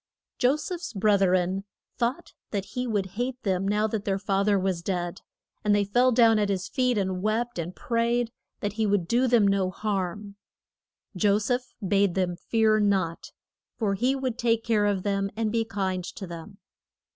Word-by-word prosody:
Jo 255 +3 +4
seph's 345 +1 -5
breth 200 -1 +3
ren 185 +1 +2 0.3
thought 260 +8 -2 0.2
that 200 -2 -2
he 250 0 -2
would 205 -4 0 0.2
hate 250 0 -2
them 190 -1 0
now 210 +1 +2
that 220 -1 -2
their 195 -2 0
fath 195 +1 0
er 205 -1 +4
was 185 -2 -1
dead. 175 -1 -3 0.4
And 210 -1 +3
they 205 - +3
fell 245 +6 +3
down 225 -2 +5
at 205 -1 +1
his 190 -1 -1
feet 250 -3 +1
and 190 -2 -1
wept 220 +1 -1
and 170 +2 -4
prayed 235 -2 0 0.3
that 205 -1 -2
he 220 0 0
would 200 -4 +1
do 245 +6 +2
them 230 -4 +4
no 195 -2 +2
harm. 200 0 -3 0.8
Jo 200 +2 +3
seph 245 +4 -2
bade 200 -2 +2
them 180 -2 0
fear 220 +3 +2
not, 190 -5 0 0.5
for 210 -4 0
he 250 +7 +1
would 260 -3 -3
take 230 -1 +2
care 215 -3 +2
of 195 -2 0
them 195 -1 0
and 220 -1 -1
be 230 0 +1
kind 190 -4 -2
to 190 - -7
them. 170 +3 -9
205 Hz, 185 wpm, -26 LUFS, 195-230 Hz, 0.8 s, down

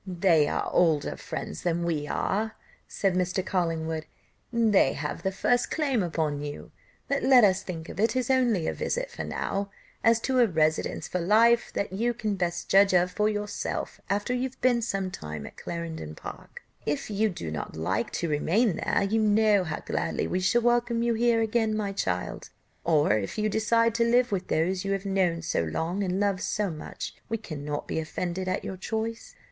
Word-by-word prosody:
"They 175 -4 +3
are - - -1
older 160 -5 +2
friends 75 - -6
than 170 0 0
we 155 -3 -1
are," 220 +8 -1 0.3
said 195 -2 0
Mr. 185 +1 0
Collingwood, 160 -4 -1 0.4
"they 220 - +4
have 150 0 -4
the 190 - -1
first 245 +5 +1
claim 280 -7 +1
upon 160 -4 -1
you; 145 0 -7 0.4
but 280 - 0
let 260 -3 +6
us 190 -1 +4
think 165 -4 -6
of - - -8
it 225 +2 +2
as 255 0 +1
only 240 -10 +2
a - - 0
visit - - -2
now. 200 0 -2 0.3
As 230 0 +5
to 260 +1 +1
a 240 - +6
residence 155 -3 0
for 180 - -2
life, 225 +6 +4
that 200 - -2
you 235 +4 0
can 215 -3 -1
best 175 -3 -2
judge 195 -1 +5
of 180 +1 +3
for 210 +3 +1
yourself 210 -1 -3
after 205 +5 0
you 250 - -1
have 255 - -24
been 245 -2 +3
some 195 -5 -2
time 75 - -6
at - - -10
Clarendon 165 - -6
Park; - - -10 0.2
if 145 +8 -2
you 215 +2 +2
do 85 - -5
not 75 - -5
like 95 +8 -1
to 170 - -1
remain 170 +7 +2
there, - - +1
you 220 +3 +1
know 210 -2 +4
how 160 -3 -4
gladly - - -2
we 185 - -1
shall 190 +6 +2
welcome 240 -1 +2
you 235 0 +2
here 230 0 +3
again, 220 -1 +1
my 205 -2 -1
child; 90 - -3 0.3
or, 155 -6 +3
if 105 -2 -2
you 215 0 +1
decide 230 +2 +2
to 230 +1 +2
live 240 +1 +3
with 190 -2 -2
those 180 +4 0
you 195 0 0
have 195 0 -3
known 185 -4 +1
so 160 - 0
long 160 - -2
and 185 0 -1
loved 200 -2 +1
so 210 -3 -1
much, 155 - -7 0.2
we 225 - 0
cannot 150 -8 -5
be - - -1
offended 175 +3 -3
at 185 - -1
your 190 - -5
choice." 225 - -4
195 Hz, 195 wpm, -27 LUFS, 165-225 Hz, 0.4 s, let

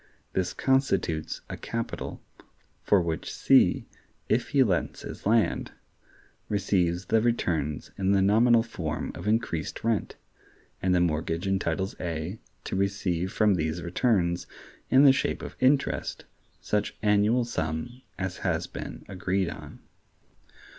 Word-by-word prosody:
This 90 -1 0
constitutes 95 - 0
a - - -5
capital, 115 0 -5 0.6
for 100 - +4
which 80 -1 -3
C, - - +4 0.4
if 120 +2 +1
he 140 -2 +5
lets 95 -8 -1
his - - -6
land, 115 +1 +2 0.8
receives 95 -3 +1
the 110 +4 +3
returns 85 -11 -1
in 95 0 +2
the 100 -1 +4
nominal 115 +3 +5
form 85 -9 -4
of - - -7
increased 110 -7 -1
rent; 115 -2 0 0.7
and 90 -1 +2
the 90 - +3
mortgage 80 +1 0
entitles 95 -1 -1
A 85 +4 -4 0.2
to - - -4
receive 95 -2 0
from 105 -2 +3
these 80 0 -1
returns, 85 -2 +1 0.4
in 130 +2 +6
the 135 -2 +8
shape 140 - -1
of - - -7
interest, 135 +2 +1 0.3
such 105 -1 -1
annual 105 +4 +3
sum 80 +4 -3 0.2
as 95 -1 -3
has - - -1
been - - -8
agreed 95 -1 -1
on. - - -10
95 Hz, 130 wpm, -27 LUFS, 85-115 Hz, 0.8 s, the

